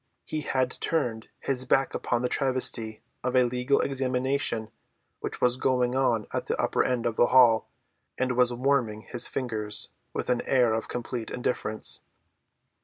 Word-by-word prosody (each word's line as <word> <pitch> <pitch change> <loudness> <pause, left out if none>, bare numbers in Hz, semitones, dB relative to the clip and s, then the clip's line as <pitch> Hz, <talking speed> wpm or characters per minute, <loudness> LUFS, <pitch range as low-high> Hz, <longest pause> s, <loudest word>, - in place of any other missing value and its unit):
He 155 - -4
had 130 -3 0
turned 120 -9 -1
his 130 -2 0
back 135 +1 +2
upon 120 0 -1
the - - +2
travesty 125 -5 0 0.2
of 125 +1 -1
a 130 - +6
legal 125 +3 +1
examination 130 -3 0 0.5
which - - -5
was 125 0 +2
going 125 -2 +1
on 120 -5 +1
at - - -2
the - - -2
upper - - +1
end 125 -2 -1
of 115 -2 -1
the 120 - +5
hall 120 -3 +5 0.5
and 130 -1 0
was 125 0 +4
warming 120 -4 0
his 120 0 +1
fingers 110 -5 -1 0.2
with - - -2
an 125 - +1
air 125 -4 +3
of 110 - -2
complete 120 -1 -5
indifference. 120 -3 0
125 Hz, 160 wpm, -27 LUFS, 115-130 Hz, 0.5 s, a